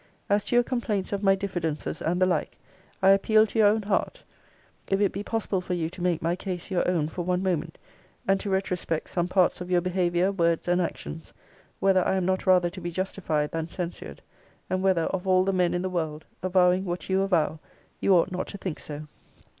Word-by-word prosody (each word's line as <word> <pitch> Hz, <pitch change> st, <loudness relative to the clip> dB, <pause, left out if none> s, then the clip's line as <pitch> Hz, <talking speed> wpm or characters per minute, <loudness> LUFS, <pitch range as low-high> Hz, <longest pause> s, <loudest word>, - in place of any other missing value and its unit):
'As 205 Hz, 0 st, +3 dB
to -, -, 0 dB
your 240 Hz, -, +6 dB
complaints 225 Hz, -6 st, -2 dB
of 200 Hz, -, -1 dB
my 195 Hz, -1 st, +4 dB
diffidences, 175 Hz, -6 st, -3 dB
and 175 Hz, +3 st, 0 dB
the 185 Hz, -, +5 dB
like, 185 Hz, -, -1 dB, 0.5 s
I 190 Hz, -, +7 dB
appeal 215 Hz, +3 st, +5 dB
to 220 Hz, +1 st, -3 dB
your 210 Hz, -, +7 dB
own 215 Hz, +1 st, +2 dB
heart, 200 Hz, 0 st, -1 dB, 0.7 s
if 195 Hz, -, +2 dB
it 205 Hz, -1 st, +2 dB
be 200 Hz, -, -4 dB
possible 205 Hz, -3 st, -1 dB
for 180 Hz, 0 st, -3 dB
you 165 Hz, -1 st, -2 dB
to 180 Hz, -, -9 dB
make 175 Hz, -3 st, 0 dB
my 170 Hz, +1 st, +1 dB
case 185 Hz, 0 st, -5 dB
your 180 Hz, -1 st, +1 dB
own 165 Hz, -4 st, +1 dB
for 170 Hz, +3 st, -5 dB
one 180 Hz, +1 st, 0 dB
moment, 170 Hz, -4 st, -1 dB, 0.5 s
and 195 Hz, 0 st, +3 dB
to 205 Hz, -, -4 dB
retrospect 180 Hz, -4 st, -2 dB
some 175 Hz, -1 st, 0 dB
parts 180 Hz, -1 st, +2 dB
of 180 Hz, -, -6 dB
your 180 Hz, -1 st, +3 dB
behaviour, 180 Hz, +1 st, +1 dB
words, 170 Hz, -4 st, +1 dB
and 175 Hz, +1 st, +2 dB
actions, 165 Hz, -1 st, -5 dB, 0.5 s
whether 190 Hz, -2 st, +3 dB
I 190 Hz, -, +1 dB
am 190 Hz, -2 st, 0 dB
not 185 Hz, +1 st, -1 dB
rather 180 Hz, -2 st, +4 dB
to 185 Hz, +1 st, -9 dB
be 175 Hz, -, -3 dB
justified 170 Hz, -4 st, -2 dB
than 165 Hz, -1 st, -3 dB
censured: 175 Hz, 0 st, -6 dB, 0.5 s
and 185 Hz, 0 st, 0 dB
whether, 190 Hz, -3 st, +2 dB
of 190 Hz, +2 st, -3 dB
all 185 Hz, 0 st, +4 dB
the 195 Hz, +1 st, 0 dB
men 180 Hz, -2 st, +2 dB
in 175 Hz, +1 st, -1 dB
the -, -, 0 dB
world, 160 Hz, -4 st, -3 dB, 0.2 s
avowing 185 Hz, 0 st, +3 dB
what 175 Hz, -1 st, -4 dB
you 190 Hz, 0 st, +2 dB
avow, 165 Hz, -5 st, +1 dB, 0.4 s
you 195 Hz, -, +4 dB
ought 175 Hz, +2 st, +3 dB
not 180 Hz, 0 st, -3 dB
to 200 Hz, -, -6 dB
think 185 Hz, -5 st, -5 dB
so. 150 Hz, 0 st, -7 dB
185 Hz, 215 wpm, -26 LUFS, 175-195 Hz, 0.7 s, I